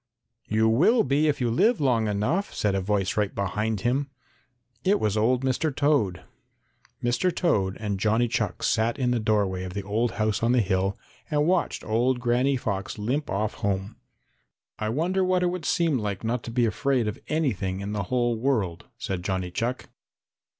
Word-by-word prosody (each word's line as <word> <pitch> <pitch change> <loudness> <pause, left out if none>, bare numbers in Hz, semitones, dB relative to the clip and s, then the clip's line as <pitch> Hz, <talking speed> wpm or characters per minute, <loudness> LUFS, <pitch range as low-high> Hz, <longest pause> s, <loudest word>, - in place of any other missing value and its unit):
"You 110 +1 +2
will 170 - +4
be 140 +3 +2
if 150 - +1
you 120 -2 0
live 225 - +3
long 120 -6 +2
enough," 115 - -1
said 105 -2 +1
a 95 - 0
voice 100 0 0
right 105 -2 0
behind 105 +1 -1
him. 135 +5 0 0.7
It 200 +2 +3
was 105 -1 0
old 120 +4 +2
Mr. 135 +5 +1
Toad. 140 - +1 0.8
Mr. 125 +10 +1
Toad 100 - 0
and 105 -3 -2
Johnny 110 +4 +2
Chuck 105 -5 -2
sat 115 +2 +1
in 125 -3 +1
the 120 - +1
doorway 100 -4 0
of 90 0 -7
the 100 - -3
old 110 +4 0
house 110 -1 0
on 115 +2 +2
the 125 - +4
hill 95 0 0 0.3
and 150 -1 +2
watched 180 +1 0
old 120 +3 +1
Granny 125 +3 +2
Fox 100 -4 -3
limp 130 +8 -2
off 105 +2 -1
home. 100 +1 -2 0.8
"I 110 0 -1
wonder 175 +10 0
what 185 0 +2
it 175 - +2
would 180 -3 -5
seem 160 -4 +2
like 100 -2 -3
not 115 +2 -1
to 115 - -5
be 120 0 +2
afraid 125 +1 0
of 105 - -4
anything 105 - -1
in 100 +1 -4
the 100 -2 -2
whole 120 -2 +1
world," 105 -8 -1
said 95 -6 -3
Johnny 95 -2 -2
Chuck. 120 +7 -2
115 Hz, 185 wpm, -26 LUFS, 100-135 Hz, 0.8 s, will